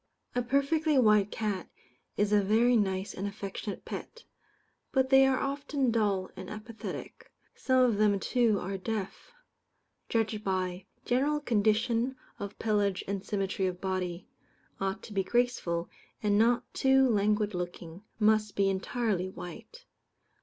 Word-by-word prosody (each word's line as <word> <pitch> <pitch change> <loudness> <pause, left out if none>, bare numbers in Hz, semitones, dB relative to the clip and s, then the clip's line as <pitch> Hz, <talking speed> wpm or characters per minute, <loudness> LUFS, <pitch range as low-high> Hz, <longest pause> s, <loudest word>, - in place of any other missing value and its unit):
A 245 - +1
perfectly 280 +5 +2
white 210 -4 +5
cat 205 -5 -3 0.5
is 205 0 +2
a 205 - +5
very 225 +5 +3
nice 190 -3 0
and 195 +2 -3
affectionate 200 0 -6
pet; 465 - -7 0.7
but 265 0 +1
they 270 0 +7
are 265 -1 +2
often 275 -2 -1
dull 205 -4 0
and 190 - -8
apathetic. 215 +1 -8 0.2
Some 260 -1 +2
of 235 -5 +3
them, 205 -1 +3
too, 230 -2 +2
are 195 +1 -4
deaf. 210 - -4 0.8
Judged 220 -2 0
by: 185 -1 -2 0.2
General 280 +5 +1
condition 230 +1 +1 0.2
of 200 0 -6
pelage 205 -3 0
and 195 -1 -3
symmetry 195 -2 -1
of 180 -1 -4
body. 185 -2 -3 0.5
Ought 195 +1 -2
to 215 - -9
be 195 -1 +1
graceful, 190 -7 0 0.4
and 205 -1 +3
not 235 +3 +4
too 265 0 +4
languid 210 -1 +1
looking. 175 -1 -6 0.2
Must 215 -1 +2
be 195 -1 +3
entirely 190 -1 -1
white. 190 - -10
210 Hz, 140 wpm, -30 LUFS, 195-245 Hz, 0.8 s, they